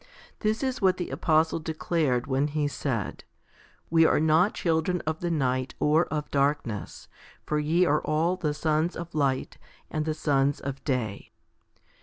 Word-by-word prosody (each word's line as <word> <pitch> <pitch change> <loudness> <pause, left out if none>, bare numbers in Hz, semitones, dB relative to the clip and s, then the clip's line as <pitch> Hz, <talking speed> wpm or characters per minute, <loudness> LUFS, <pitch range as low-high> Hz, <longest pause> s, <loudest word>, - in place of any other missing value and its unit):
This 220 +3 0
is 260 -1 -2
what 185 -1 +3
the 180 - -4
apostle 160 0 +2
de 160 0 -5
clared 150 -8 0
when 140 +1 +1
he 150 0 -1
said, 130 -7 -3 0.7
We 165 0 +5
are 160 - +4
not 160 +5 +3
children 170 +1 0
of 160 0 -2
the 175 - -2
night 130 -5 -1
or 155 +3 +3
of 150 -1 -4
darkness, 140 -7 -1 0.4
for 150 - 0
ye 165 +4 +2
are 150 -2 +2
all 160 +4 +1
the 155 -5 -2
sons 155 +3 0
of 170 0 -7
light 140 -3 -1 0.3
and 155 0 -1
the 155 -1 -1
sons 140 -2 +1
of 135 0 -6
day. 120 -8 -2
155 Hz, 165 wpm, -27 LUFS, 140-165 Hz, 0.7 s, We